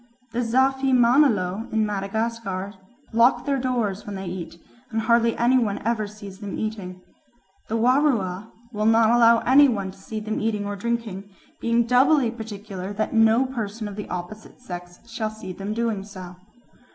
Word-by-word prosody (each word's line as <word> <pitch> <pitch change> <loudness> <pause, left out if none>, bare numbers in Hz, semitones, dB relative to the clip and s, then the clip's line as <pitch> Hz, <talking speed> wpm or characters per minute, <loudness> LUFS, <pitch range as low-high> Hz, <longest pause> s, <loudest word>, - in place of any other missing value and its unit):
The 235 - -2
Zafimanelo 245 -4 +2
in 220 -1 +2
Madagascar 200 -1 -3 0.4
lock 235 +3 +4
their 280 -2 0
doors 235 -6 -1
when 205 - -7
they 190 0 -6
eat, 175 -1 -6 0.3
and 225 -1 -1
hardly 230 0 +2
any 250 +2 +4
one 210 -4 -1
ever 225 -2 0
sees 200 -2 -11
them 205 -2 -6
eating. 195 -4 -5 0.7
The 225 - -1
Warua 225 -6 +1 0.2
will 210 0 0
not 225 0 +5
allow 235 -1 +5
any 280 +3 +6
one 200 -5 -2
to - - -18
see 215 +2 -5
them 215 0 -3
eating 210 -2 -1
and 200 -1 -5
drinking, 230 -4 -3 0.3
being 235 0 +2
doubly 250 +1 +4
particular 205 -4 -7
that 215 +1 -2
no 225 +3 +4
person 225 -4 -4
of 205 - -7
the 210 - -7
opposite 180 +7 -7
sex 180 -2 -9
shall 225 -2 -3
see 215 -4 -8
them 195 +3 -5
doing 225 -4 -1
so. 185 -3 -10
220 Hz, 165 wpm, -24 LUFS, 200-235 Hz, 0.7 s, any